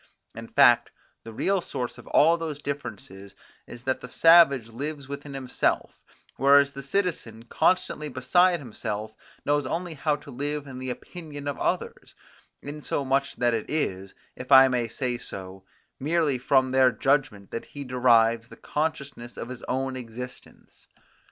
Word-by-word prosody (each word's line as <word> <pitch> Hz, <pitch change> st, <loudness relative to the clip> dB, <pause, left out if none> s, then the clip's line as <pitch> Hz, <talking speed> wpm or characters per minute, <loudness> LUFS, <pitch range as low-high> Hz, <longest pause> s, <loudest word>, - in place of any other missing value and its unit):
In -, -, -9 dB
fact, -, -, +5 dB, 0.3 s
the 115 Hz, -, -9 dB
real 195 Hz, -, 0 dB
source 125 Hz, -7 st, -5 dB
of -, -, -14 dB
all 165 Hz, +3 st, +5 dB
those 155 Hz, -4 st, -5 dB
differences, 100 Hz, -8 st, -7 dB, 0.3 s
is 120 Hz, 0 st, -11 dB
that 130 Hz, 0 st, -1 dB
the 125 Hz, -, -9 dB
savage 140 Hz, -7 st, +6 dB
lives 140 Hz, +4 st, -6 dB
within 140 Hz, 0 st, -7 dB
himself, 130 Hz, -2 st, -1 dB, 0.4 s
whereas 140 Hz, +1 st, +5 dB
the 140 Hz, -, -8 dB
citizen, 140 Hz, -, -2 dB
constantly 150 Hz, +2 st, 0 dB
beside 175 Hz, +8 st, +3 dB
himself, 110 Hz, -4 st, -5 dB, 0.3 s
knows 145 Hz, -2 st, +1 dB
only 170 Hz, +3 st, -3 dB
how 150 Hz, 0 st, 0 dB
to 145 Hz, 0 st, -12 dB
live 145 Hz, +3 st, -3 dB
in 130 Hz, -2 st, -9 dB
the 130 Hz, 0 st, -5 dB
opinion 145 Hz, +1 st, -8 dB
of 145 Hz, -, -3 dB
others; -, -, -3 dB, 0.5 s
insomuch 140 Hz, -2 st, -2 dB
that 120 Hz, -1 st, +1 dB
it 110 Hz, -2 st, -3 dB
is, 95 Hz, -11 st, -2 dB, 0.2 s
if 125 Hz, +2 st, -9 dB
I 135 Hz, 0 st, +9 dB
may 125 Hz, -2 st, 0 dB
say 120 Hz, +1 st, -3 dB
so, 95 Hz, -4 st, -8 dB, 0.3 s
merely 150 Hz, -2 st, +1 dB
from 130 Hz, 0 st, +2 dB
their 130 Hz, -1 st, +5 dB
judgment 135 Hz, -8 st, 0 dB
that 115 Hz, -, -5 dB
he 145 Hz, -, -8 dB
derives 115 Hz, -3 st, +3 dB
the -, -, -13 dB
consciousness 140 Hz, -5 st, -4 dB
of 120 Hz, -, -6 dB
his 130 Hz, -, -8 dB
own 130 Hz, 0 st, -2 dB
existence. 125 Hz, 0 st, -10 dB
135 Hz, 150 wpm, -26 LUFS, 120-145 Hz, 0.5 s, I